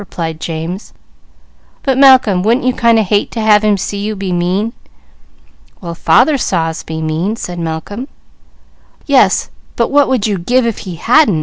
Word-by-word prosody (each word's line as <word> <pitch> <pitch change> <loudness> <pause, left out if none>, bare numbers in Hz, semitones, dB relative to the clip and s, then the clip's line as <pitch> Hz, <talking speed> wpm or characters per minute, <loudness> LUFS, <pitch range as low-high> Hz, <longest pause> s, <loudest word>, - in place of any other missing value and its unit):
replied 165 -5 -6
James. 165 +5 -6 0.9
"But 270 -2 +1
Malcolm, 260 -8 +5
wouldn't 235 +6 +1
you 255 - +2
kind 235 -2 +3
o' 220 - +3
hate 205 +1 0
to 230 - -4
have 215 -1 +3
him 210 -1 +2
see 200 +2 -4
you 210 +1 -3
be 190 -2 -4
mean?" 185 +6 -1 1.1
"Well 170 -3 -6
father 265 - +3
saw 165 -8 0
us 160 - -6
be 160 0 -6
mean," 165 +7 -2
said 175 -5 -6
Malcolm. 170 +9 -5 1.0
"Yes, 255 -10 +2 0.2
but 235 - 0
what 285 0 +3
would 255 -6 0
you 205 -4 -1
give 245 +8 +1
if 230 -2 -2
he 170 - -7
_hadn't? 235 - +3
205 Hz, 175 wpm, -14 LUFS, 175-235 Hz, 1.1 s, Malcolm